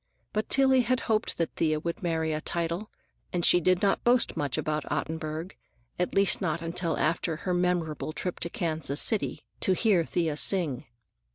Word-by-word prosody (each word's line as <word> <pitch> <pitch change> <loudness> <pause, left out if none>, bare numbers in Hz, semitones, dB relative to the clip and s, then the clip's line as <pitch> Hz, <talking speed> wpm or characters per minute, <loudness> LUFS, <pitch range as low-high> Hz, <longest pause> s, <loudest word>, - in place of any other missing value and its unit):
But 215 0 -2
Tillie 265 -1 +4
had 255 +1 0
hoped 220 -1 0
that 165 - -1
Thea 155 -1 +1
would 170 +2 -4
marry 160 -3 -1
a 155 - -3
title, 170 +6 -2 0.4
and 175 -1 0
she 175 - +6
did 185 +2 +2
not 200 - +2
boast 240 0 +3
much 145 -3 -2
about 155 0 -1
Ottenburg,—at 160 -2 -5
least 195 -1 +4
not 165 -3 -1
until 170 0 -2
after 165 +1 0
her 180 +3 -3
memorable 175 -4 -1
trip 180 +2 -4
to 170 - -3
Kansas 155 -4 -2
City 220 - +1
to 190 - +3
hear 190 -3 +2
Thea 160 -2 -1
sing. 150 -5 +2
170 Hz, 170 wpm, -28 LUFS, 155-190 Hz, 0.4 s, she